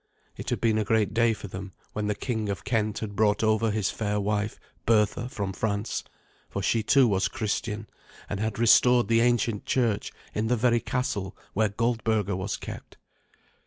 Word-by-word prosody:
It - - -6
had - - -1
been 110 -1 +2
a - - +1
great 110 0 +1
day 115 0 +4
for 105 -2 -5
them 95 0 -7 0.2
when 105 -1 -2
the 105 - 0
King 110 -5 -2
of 100 - -3
Kent 110 -5 0
had 105 -2 -5
brought 105 0 +2
over 110 +1 +3
his 105 -4 0
fair 105 -1 -1
wife, 105 +1 -1 0.3
Bertha, 110 +2 +2
from 100 -5 -3
France, 105 +1 -2 0.5
for 100 - -4
she, 115 +3 +2
too, 130 +4 +5
was 100 -2 +2
Christian, 110 -2 -3 0.4
and 100 - -4
had 110 0 -2
restored 120 +1 +5
the 115 0 +4
ancient 115 -3 +1
church 115 -5 +1 0.2
in 110 +1 -1
the 125 +1 +2
very 120 +1 +3
castle 115 -5 -2 0.2
where 110 +1 +2
Goldberga 110 -2 0
was 95 +2 -3
kept. - - -9
110 Hz, 180 wpm, -27 LUFS, 105-115 Hz, 0.5 s, too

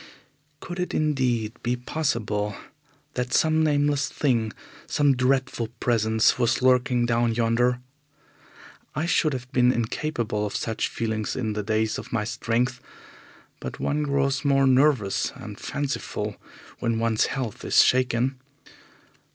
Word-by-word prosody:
Could 175 0 -6
it 180 - -2
indeed 125 -8 0
be 120 +1 0
possible 110 -6 -2 0.6
that 125 0 -3
some 160 0 +3
nameless 145 -2 +2
thing, 115 -6 0 0.4
some 145 -2 +3
dreadful 125 -2 0
presence, 110 -1 +2
was 120 +1 +1
lurking 125 -1 +3
down 115 -1 +1
yonder? 120 +2 +2 1.1
I 155 - 0
should 160 -2 +2
have 125 0 -6
been 125 -1 +4
incapable 120 -2 -2
of 105 - -3
such 110 -1 -1
feelings 110 -2 -3
in 110 -4 -2
the 105 - -2
days 110 +1 0
of - - -10
my 115 -3 0
strength, 120 +3 -1 0.8
but - - -7
one 150 +1 0
grows 140 -1 0
more 135 -1 +3
nervous 130 -6 +3
and - - -9
fanciful 140 -1 -4 0.4
when 115 -1 0
one's 115 -1 +2
health 130 -6 -4
is - - +5
shaken. 125 +1 +1
125 Hz, 130 wpm, -25 LUFS, 115-135 Hz, 1.1 s, is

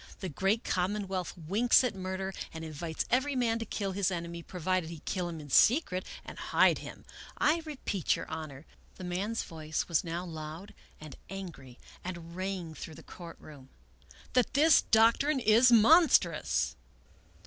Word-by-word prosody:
The 190 - -4
great 195 +8 0
common 195 +3 -1
wealth 185 -2 -4
winks 205 +11 +3
at 250 - 0
murder 190 0 -4 0.2
and 160 0 -6
invites 160 +1 -4
every 265 +3 +2
man 230 -2 +1
to 225 - -4
kill 200 -2 -3
his 195 0 0
enemy, 170 -1 -5
provided 180 0 -2
he 165 -3 -9
kill 180 -2 -2
him 165 -2 -6
in 145 -2 -10
secret 215 - +4 0.2
and - - -9
hide - - +3
him. - - -10 0.3
I 310 +3 +3
re 305 -2 -6
peat, 190 -6 +1
your - - -6
Honor," 155 -2 -7 0.2
— - - -31
the - - -8
man's 195 +6 -2
voice 155 -1 -4
was 165 -3 +1
now 170 +1 -4
loud 160 +4 -8 0.3
and 155 -3 -10
angry 165 -10 -8 0.3
and 170 -2 -7
rang 185 -3 -4
through 155 0 -9
the - - -13
court 170 -2 -11
room 140 -4 -14 0.2
— - - -31
" - - -23
that 250 0 +2
this 305 +1 +6
doc 225 +1 +4
trine 290 -1 +1
is 235 +2 +5
monstrous!" 310 +9 +4
185 Hz, 180 wpm, -30 LUFS, 165-220 Hz, 0.3 s, this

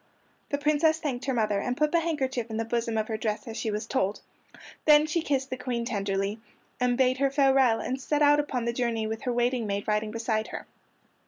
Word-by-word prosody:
The 285 - 0
Princess 305 +2 +2
thanked 275 -6 -3
her 270 - 0
mother, 215 -3 +1
and 245 +5 -2
put 300 0 +2
the 340 - +3
handkerchief 265 -8 -2
in 220 - -4
the 225 - -1
bosom 230 -1 -1
of 215 0 0
her 220 - -2
dress 215 +3 -3
as 225 - -6
she 225 - -2
was 210 +1 -3
told. 205 -6 -1 0.6
Then 300 0 +7
she 310 +2 0
kissed 270 -3 -1
the 255 - -2
Queen 250 -2 -3
tenderly, 200 -1 -2 0.4
and 250 -1 +1
bade 260 0 +2
her 275 0 +3
farewell, 270 -4 +4
and 260 +1 -3
set 295 +3 +1
out 290 0 +5
upon 260 -5 -2
the 235 - 0
journey 235 -2 -1
with 220 +1 -4
her 250 - +1
waiting 240 -1 0
maid 200 0 -3
riding 210 0 0
beside 220 -1 -1
her. - - -7
245 Hz, 225 wpm, -27 LUFS, 220-275 Hz, 0.6 s, Then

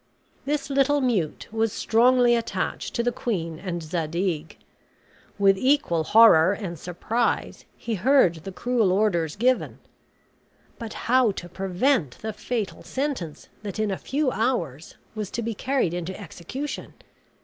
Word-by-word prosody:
This 290 0 -2
little 275 +1 +3
mute 220 - -1
was 225 0 0
strongly 245 +2 +4
attached 230 -1 -3
to 235 - +1
the 245 - +1
queen 165 -10 -3
and 175 -3 -4
Zadig. 165 0 -2 0.8
With 195 -1 +4
equal 260 - +2
horror 195 -5 +7
and 180 -6 -6
surprise 220 +7 -2
he 235 - -4
heard 210 -4 +4
the 175 +5 -8
cruel 230 -1 +1
orders 180 -6 +1
given. 250 +4 +1 1.0
But 230 -2 -6
how 250 -1 +4
to 175 - -7
prevent 190 - 0
the 220 0 -5
fatal 215 0 -4
sentence 260 - -4
that 205 -2 -6
in 215 -1 0
a 190 - -2
few 280 -1 0
hours 175 - -2 0.2
was 215 -3 -4
to 235 - -4
be 230 +1 -2
carried 255 -5 0
into 175 +2 -4
execution! 205 - -6
215 Hz, 140 wpm, -25 LUFS, 175-250 Hz, 1.0 s, horror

